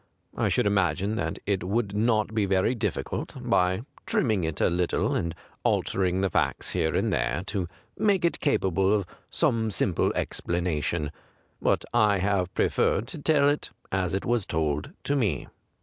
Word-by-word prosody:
I - - +1
should - - +2
imagine 100 0 +1
that - - -2
it 100 -3 0
would 100 +2 -1
not 110 0 +2
be 105 -3 +1
very 95 +5 +2
difficult, 115 - -3
by 90 +4 +1 0.2
trim 225 -6 +2
ming 110 -6 +1
it 80 -1 -2
a - - +4
little 90 0 +1
and 85 0 -1 0.3
altering 95 -1 +1
the 95 - +2
facts - - 0
here 80 - 0
and - - +1
there, - - 0
to 95 -4 -2 0.3
make 200 -4 +3
it 170 - +1
capable 95 - +2
of 100 -3 0 0.2
some 110 -1 +1
simple 90 -2 +1
explanation; 85 -3 -1 0.5
but - - +1
I 105 -4 +4
have 95 -1 0
preferred 105 +4 +2
to 160 - -6
tell 145 -2 +4
it 145 +1 0 0.2
as 95 -1 0
it 95 - -2
was 120 -4 +1
told 75 -2 -1
to 145 - 0
me. 105 - 0
100 Hz, 165 wpm, -27 LUFS, 90-110 Hz, 0.5 s, a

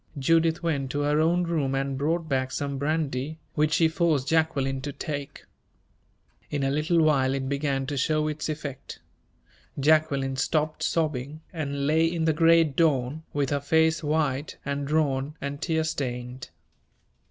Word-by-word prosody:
Judith 165 +4 +2
went 140 -5 -1
to 145 +2 -2
her 145 +1 +2
own 175 +3 +2
room 155 -6 0
and 135 0 -1
brought 160 +4 -1
back 130 -2 -1
some 140 -1 -3
brandy, 150 -1 -1 0.2
which 150 +1 +1
she 165 0 +4
forced 160 -5 +1
Jacqueline 140 -5 +1
to 145 +2 -4
take. 145 -1 -6 1.0
In 145 -2 -2
a 135 - +1
little 155 +3 +2
while 135 -3 +3
it 135 -1 -3
began 140 -1 -1
to 145 - -4
show 155 +3 +1
its 155 +1 -3
effect. 145 -3 -6 0.8
Jacqueline 140 -2 +2
stopped 155 +2 0
sobbing, 150 -2 -1
and 140 -4 -3
lay 155 +3 +3
in 165 -2 -1
the 160 - +3
great 165 -2 +4
dawn, 145 -2 +1
with 140 -2 -1
her 145 -1 0
face 160 +2 +2
white 150 -2 -1
and 140 0 -2
drawn 145 -2 0
and 140 +1 -5
tear 160 -1 0
stained. 125 -4 -4
145 Hz, 155 wpm, -26 LUFS, 135-160 Hz, 1.0 s, she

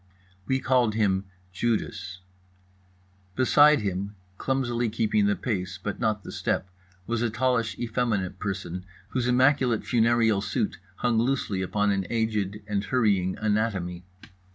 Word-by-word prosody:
We 130 0 +1
called 125 -5 +2
him 100 -3 +1 0.3
Judas. 100 -4 -2 1.1
Beside 145 +3 +5
him, 100 +1 -3 0.2
clumsily 120 -3 0
keeping 105 -2 +1
the 105 - +2
pace 90 -5 -3
but 100 +2 -5
not 110 -3 0
the - - -8
step, 95 - -2 0.3
was 115 +1 -1
a 120 - +1
tallish 115 0 0
effeminate 110 -6 -1
person 95 -3 -4 0.3
whose 125 -2 -1
immaculate 130 -2 +3
funereal 115 -3 +3
suit 100 -1 -2 0.2
hung 120 0 +1
loosely 115 -6 0
upon 105 +2 +1
an 95 -2 -1
aged 105 -3 -1
and 105 -1 -1
hurrying 100 -7 +1
anatomy. 105 -5 -1
110 Hz, 130 wpm, -26 LUFS, 100-120 Hz, 1.1 s, Beside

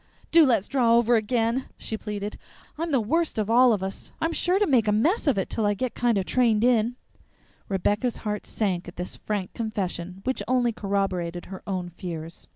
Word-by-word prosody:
"Do 330 -3 +7
let's 230 -6 +2
draw 240 -4 +3
over 235 0 +4
again," 230 +3 +1
she 220 - -4
pleaded. 210 -1 -5 0.4
"I'm 330 +2 -3
the 270 - +3
worst 320 +9 0
of 215 0 0
all 250 +1 +6
of 205 -4 0
us. 190 0 -5
I'm 330 +1 0
sure 360 +3 +1
to 415 - +3
make 250 - +3
a - - +4
mess 305 - +2
of 270 -7 +3
it 195 - 0
till 225 - -2
I 205 - +1
kind 240 -1 0
o' - - +2
get - - -6
trained 230 -2 +2
in." 240 -1 +3 0.7
Rebecca's 205 +5 0
heart 210 0 -3
sank 185 -5 -1
at 175 - -9
this 180 +1 -5
frank 205 -3 -3
confession, 190 -5 -4
which 260 +1 -1
only 245 -2 +2
corroborated 195 -5 -2
her 190 0 -8
own 185 -3 -3
fears. 165 -2 -7
215 Hz, 200 wpm, -25 LUFS, 195-245 Hz, 0.7 s, Do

